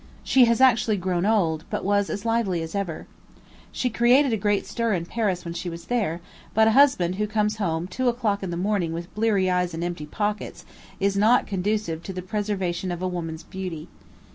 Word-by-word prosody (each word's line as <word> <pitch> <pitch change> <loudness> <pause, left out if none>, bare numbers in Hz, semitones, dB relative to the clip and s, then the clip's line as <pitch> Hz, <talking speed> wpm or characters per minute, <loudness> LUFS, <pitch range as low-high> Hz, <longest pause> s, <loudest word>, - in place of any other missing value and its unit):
She 260 -2 +5
has 235 0 +2
actually 230 -5 +4
grown 180 0 -1
old, 170 -8 +1
but - - -3
was 205 0 +2
as 205 +2 -4
lively 220 -7 0
as 165 - -7
ever. 195 -6 -3 0.7
She 250 - -1
created 245 +3 +4
a - - +3
great 205 -1 0
stir 230 -2 -1
in 170 -3 -1
Paris 190 -3 -2
when 170 - -4
she 175 +1 -4
was 170 0 -8
there; 200 -9 -1 0.3
but 220 0 +5
a - - +5
husband 220 -9 +4
who 210 0 0
comes 210 0 0
home 170 -5 -1
two 250 +7 0
o'clock 225 -4 -1
in 190 - -4
the 170 - -3
morning 185 -3 0
with 170 +2 -6
bleared 210 -2 +2
eyes 180 -2 0
and 165 - -3
empty 175 -4 -4
pockets, 210 +5 -3 0.3
is 195 0 +1
not 220 +5 +4
conducive 195 -4 -2
to 190 - -7
the 185 0 -5
preservation 190 -3 -2
of 175 +1 -4
a - - +1
woman's 165 -3 -5
beauty. 180 -5 -6
195 Hz, 205 wpm, -24 LUFS, 175-220 Hz, 0.7 s, She